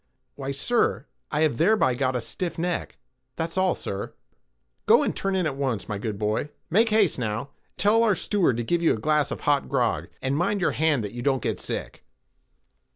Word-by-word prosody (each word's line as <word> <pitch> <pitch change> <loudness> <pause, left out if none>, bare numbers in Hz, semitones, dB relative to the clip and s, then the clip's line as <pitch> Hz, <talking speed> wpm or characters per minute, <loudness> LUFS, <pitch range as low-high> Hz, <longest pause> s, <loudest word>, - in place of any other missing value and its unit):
"Why, 135 -1 -5
sir, 150 - +1 0.2
I 150 - 0
have 155 -7 +1
thereby 180 - +4
got 130 0 0
a 125 - 0
stiff 175 +8 -4
neck—that's 165 -3 -5
all, 185 -1 +2
sir." 100 0 -5 0.7
"Go - - +6
and - - -1
turn 195 0 -1
in 185 -2 +1
at 150 -4 -1
once, 130 -6 -2
my 105 -1 -3
good 105 -1 -3
boy—make 150 - 0
haste, 210 -9 +3
now—tell 140 - 0
our 220 -4 +3
steward 185 - +1
to 120 - -1
give 170 +8 0
you 165 - +4
a - - -7
glass 150 +3 +2
of - - -5
hot 145 -1 +1
grog, - - 0
and 130 +1 -1
mind 195 +6 +1
your 185 - +2
hand 155 -6 +1
that 105 0 -5
you 120 - -5
don't 135 0 +1
get - - -1
sick." - - -5
145 Hz, 190 wpm, -25 LUFS, 125-185 Hz, 0.7 s, Go